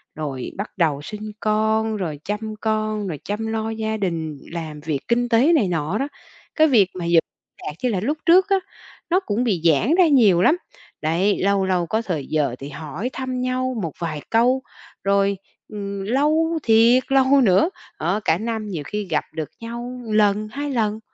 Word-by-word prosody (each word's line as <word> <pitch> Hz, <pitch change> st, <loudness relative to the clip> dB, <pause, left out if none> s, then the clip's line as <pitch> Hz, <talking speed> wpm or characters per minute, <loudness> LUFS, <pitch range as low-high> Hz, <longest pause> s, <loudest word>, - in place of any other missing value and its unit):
rồi 140 Hz, -5 st, -4 dB
bắt 200 Hz, +2 st, -4 dB
đầu 155 Hz, -5 st, +1 dB
sinh 210 Hz, +6 st, -7 dB
con, 220 Hz, 0 st, +1 dB
rồi 160 Hz, -7 st, -4 dB
chăm 215 Hz, +1 st, -3 dB
con, 215 Hz, -1 st, -1 dB
rồi 155 Hz, -6 st, -4 dB
chăm 210 Hz, +2 st, -3 dB
lo 220 Hz, 0 st, -2 dB
gia 220 Hz, 0 st, -2 dB
đình, 165 Hz, -6 st, -2 dB
làm 160 Hz, -3 st, -5 dB
việc 150 Hz, -2 st, -2 dB
kinh 240 Hz, +1 st, +1 dB
tế 255 Hz, +8 st, +4 dB
này 250 Hz, -11 st, +3 dB
nọ 165 Hz, +2 st, -1 dB
đó, 275 Hz, -, -1 dB, 0.5 s
cái 315 Hz, 0 st, +5 dB
việc 215 Hz, -10 st, +4 dB
mà 180 Hz, -2 st, -4 dB
vẫn 170 Hz, -1 st, +5 dB, 0.4 s
lạc 150 Hz, -, -4 dB
như 250 Hz, -, +2 dB
là 200 Hz, -5 st, 0 dB
lúc 280 Hz, +11 st, -1 dB
trước 370 Hz, +3 st, +5 dB
á, 395 Hz, -, +4 dB, 0.5 s
nó 360 Hz, +2 st, +4 dB
cũng 230 Hz, -, -1 dB
bị 200 Hz, -9 st, 0 dB
giãn 170 Hz, -, +4 dB
ra 365 Hz, -2 st, +5 dB
nhiều 220 Hz, -, +5 dB
lắm. 310 Hz, -, +4 dB, 0.4 s
Đấy, 175 Hz, +7 st, +1 dB
lâu 200 Hz, 0 st, +2 dB
lâu 180 Hz, -2 st, +1 dB
có 220 Hz, +6 st, 0 dB
thời 170 Hz, -11 st, -3 dB
giờ 145 Hz, -5 st, 0 dB
thì 140 Hz, -, -7 dB
hỏi 155 Hz, -, -5 dB
thăm 255 Hz, -1 st, -3 dB
nhau 255 Hz, 0 st, -1 dB
một 160 Hz, -4 st, -3 dB
vài 155 Hz, -3 st, -3 dB
câu, 245 Hz, +3 st, +3 dB, 0.4 s
rồi, 200 Hz, 0 st, +2 dB, 0.3 s
ừm, 200 Hz, -2 st, -5 dB
lâu 305 Hz, +8 st, +1 dB
thiệt 230 Hz, +3 st, +5 dB
lâu 270 Hz, +1 st, +5 dB
nữa, 195 Hz, -, +4 dB, 0.3 s
đó, 175 Hz, +6 st, 0 dB
cả 160 Hz, -, +3 dB
năm 220 Hz, +1 st, -3 dB
nhiều 170 Hz, -7 st, -4 dB
khi 210 Hz, 0 st, -3 dB
gặp 150 Hz, -, +1 dB
được 155 Hz, -2 st, -4 dB
nhau 240 Hz, +2 st, -6 dB
một 220 Hz, -, -4 dB
lần, 210 Hz, 0 st, +3 dB
hai 285 Hz, +4 st, -4 dB
lần, 220 Hz, -4 st, 0 dB
215 Hz, 195 wpm, -22 LUFS, 175-245 Hz, 0.5 s, cái